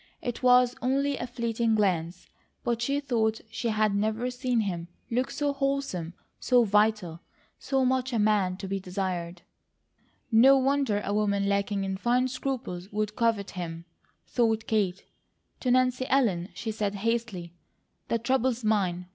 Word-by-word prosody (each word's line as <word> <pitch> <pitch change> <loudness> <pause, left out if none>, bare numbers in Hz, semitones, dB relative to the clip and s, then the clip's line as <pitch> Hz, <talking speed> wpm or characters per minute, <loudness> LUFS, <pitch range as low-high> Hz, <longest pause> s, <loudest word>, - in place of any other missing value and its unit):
It 245 - -4
was 250 -1 +5
only 275 +3 +1
a 245 - -4
fleeting 235 -2 0
glance, 180 -4 0 0.4
but 235 -1 -1
she 280 +4 0
thought 225 -6 0
she 240 - -3
had 215 -2 +2
never 220 +4 0
seen 250 -2 0
him 175 -5 -3 0.2
look 255 +3 0
so 290 0 -1
wholesome, 275 - -2 0.2
so 250 -2 +4
vital, 210 -5 +1 0.4
so 270 -1 0
much 260 0 +1
a 235 - 0
man 205 -4 +2
to 195 - -6
be 195 +1 -2
desired. 180 -2 -4 0.9
"No 260 +5 +7
wonder 270 -6 +1
a 200 - -1
woman 200 -1 +1
lacking 200 0 0
in 190 0 -2
fine 245 +5 +2
scruples 245 -8 -4
would 210 0 -2
covet 225 -4 0
him," 170 -2 -6 0.4
thought 225 -2 +1
Kate. 200 -5 0 0.5
To 255 - -1
Nancy 255 0 +2
Ellen 205 -10 +2
she 225 - -4
said 210 -2 -2
hastily: 210 -5 -2 0.5
"The 230 - +1
trouble's 250 0 0
mine. 190 -5 0
220 Hz, 150 wpm, -27 LUFS, 195-250 Hz, 0.9 s, No